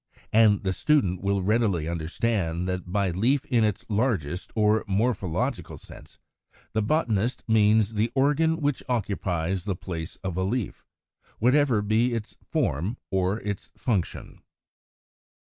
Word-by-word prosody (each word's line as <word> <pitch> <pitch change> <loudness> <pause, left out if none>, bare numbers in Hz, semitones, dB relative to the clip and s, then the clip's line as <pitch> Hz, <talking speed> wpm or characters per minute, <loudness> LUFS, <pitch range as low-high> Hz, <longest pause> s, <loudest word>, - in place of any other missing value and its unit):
And 110 -2 +5
the 95 -1 0
student 100 - +1
will 100 0 0
readily 100 -6 +1
understand 85 +1 -1
that 90 -1 -4
by 100 -2 +1
leaf 120 +10 +1
in 120 -3 +2
its 105 -2 -1
largest 100 - -1
or 110 0 +3
morphological 100 -3 -1
sense, - - -14 0.6
the 110 - +1
botanist 120 -3 0
means 110 -1 +4
the 110 +2 0
organ 150 +4 +2
which 145 -2 0
occupies 95 -6 -1
the 100 -3 -1
place 85 -2 -6
of 95 -3 -3
a 95 - +1
leaf, 110 +2 -3 0.5
whatever 125 -3 +3
be 115 +4 +2
its 110 -2 -5
form 90 - -1
or 95 +3 0
its 100 -1 -5
function. 100 -9 -2
105 Hz, 130 wpm, -26 LUFS, 95-115 Hz, 0.6 s, And